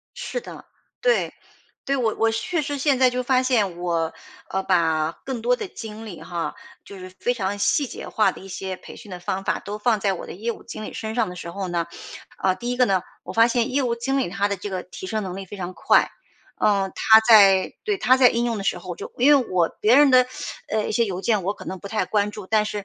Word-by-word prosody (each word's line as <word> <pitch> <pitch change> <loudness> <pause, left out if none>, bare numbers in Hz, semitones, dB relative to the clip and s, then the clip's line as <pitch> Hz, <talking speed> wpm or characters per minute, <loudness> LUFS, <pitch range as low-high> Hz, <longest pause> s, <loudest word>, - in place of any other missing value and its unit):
是 - - -4
的， - - -11 0.4
对， - - +2 0.5
对。 275 0 0
我 230 -4 0
我 225 0 +2
确 310 +10 -1
实 290 0 -3
现 275 -1 +2
在 255 -1 +5
就 250 0 -2
发 255 0 +2
现 215 -9 +1
我， 170 -2 -1 0.4
呃， 190 - -1
把 160 -4 +1
更 260 -3 -4
多 245 +2 +2
的 395 - -5
精 220 -6 -8
力 185 -6 -9
哈， 170 -1 -4 0.3
就 200 - -11
是 185 0 -9
非 245 - +1
常 200 -2 -2
细 285 +7 +2
节 - - -8
化 215 -3 +2
的 - - -12
一 195 - -11
些 190 0 -5
培 - - -12
训 210 - -12
的 180 -1 -7
方 190 +2 -3
法 - - 0
都 205 +1 -6
放 220 0 +1
在 195 -1 +1
我 185 - -6
的 - - -7
业 225 +6 -3
务 - - -13
经 215 - -8
理 - - -7
身 220 0 -5
上 230 -4 +1
的 180 - -8
时 170 -1 -7
候 190 +1 -4
呢， 170 -1 -1 0.5
啊， 190 -1 +1
第 240 +5 -5
一 245 - -1
个 250 - +5
呢， 190 -5 +1 0.2
我 - - -7
发 230 +1 +5
现 240 +1 0
业 280 +1 +2
务 240 -2 0
经 270 +4 -1
理 265 - 0
他 200 +3 0
的 200 - -2
这 200 +2 -6
个 185 -1 -3
提 185 - -9
升 215 +2 -2
能 185 -2 -5
力 195 - -6
非 205 - -9
常 185 -1 -5
快。 - - +3 0.5
嗯， 195 -2 +2
他 220 0 +7
在 200 -4 +6
对， 420 -1 0
他 255 -6 +4
在 260 -1 +7
应 235 0 0
用 230 -2 -1
的 195 - -5
时 180 - 0
候， 180 +1 -9
我 175 - -5
就 - - -8
因 260 +4 +4
为 255 - -3
我 175 -3 +2
别 220 +3 +5
人 285 +1 +7
的， 255 -1 +6 0.4
呃 215 0 -1
一 - - -3
些 235 +2 +2
邮 190 -4 -4
件， 210 -2 +1
我 200 +3 -1
可 - - -11
能 190 - -5
不 200 - -10
太 215 +2 -1
关 210 -1 0
注。 205 -3 -9
但 215 -1 +3
是 210 -1 -4
210 Hz, 285 characters per minute, -23 LUFS, 190-245 Hz, 0.5 s, 他